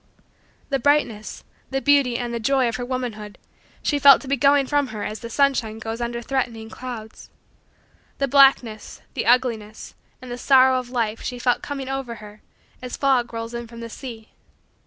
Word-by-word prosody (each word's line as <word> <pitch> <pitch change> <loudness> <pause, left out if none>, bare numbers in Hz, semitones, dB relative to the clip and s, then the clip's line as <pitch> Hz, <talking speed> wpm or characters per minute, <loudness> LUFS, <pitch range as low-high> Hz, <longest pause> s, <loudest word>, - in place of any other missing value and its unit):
The 275 -1 0
brightness, 235 -6 0 0.3
the 270 - -1
beauty, 275 -4 +3
and 240 -1 -4
the 235 - -2
joy, 260 +2 +2
of 230 - -2
her 245 - -4
womanhood, 240 -5 -5 0.5
she 290 - +1
felt 280 -1 +8
to - - -10
be 280 - +1
going 280 +1 +4
from 290 0 +1
her 215 -3 -6
as 215 +1 -5
the 230 - -8
sunshine 245 -4 +1
goes 225 +1 -5
under 235 0 -3
threatening 235 -4 -3
clouds. 235 -4 -8 0.9
The 275 - 0
blackness, 265 -5 +3
the - - -3
ugliness, 230 -4 0 0.3
and 255 -1 -10
the 245 - -5
sorrow, 260 -1 +5
of 250 -1 -8
life, 230 -3 -2
she 250 - -5
felt 245 0 +1
coming 275 -2 -5
over 270 -3 -4
her 210 -1 -13 0.4
as 250 -1 -6
fog 260 -4 +2
rolls 230 0 -6
in 235 0 -5
from 230 0 -12
the 230 -1 -7
sea. 230 -4 -9
245 Hz, 180 wpm, -23 LUFS, 230-270 Hz, 0.9 s, felt